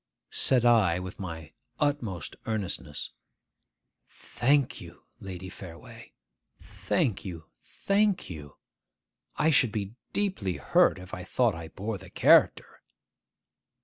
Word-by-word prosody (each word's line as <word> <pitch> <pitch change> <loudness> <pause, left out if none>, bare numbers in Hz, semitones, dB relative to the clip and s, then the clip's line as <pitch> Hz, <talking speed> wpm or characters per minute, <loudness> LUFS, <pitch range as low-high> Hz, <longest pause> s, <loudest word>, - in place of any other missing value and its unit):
Said 125 -2 +4
I, 110 -8 +5
with 90 0 -7
my 80 -5 -7 0.3
utmost 120 - -1
earnestness, 100 -9 -3 1.0
'Thank 140 +2 0
you, - - -13 0.2
Lady 95 -1 -7
Fareway, 90 -2 -11 0.5
thank 110 -6 -1
you, 85 -5 -7 0.2
thank 200 -1 0
you! 75 -4 -9 0.8
I 160 +2 +3
should 130 -6 +4
be 105 -1 -4 0.2
deeply 185 - -1
hurt - - +3
if 90 0 -11
I 90 - -5
thought 115 +4 +1
I 85 -1 -7
bore 100 +4 -5
the 95 0 -13
character. - - +4
100 Hz, 115 wpm, -28 LUFS, 90-125 Hz, 1.0 s, I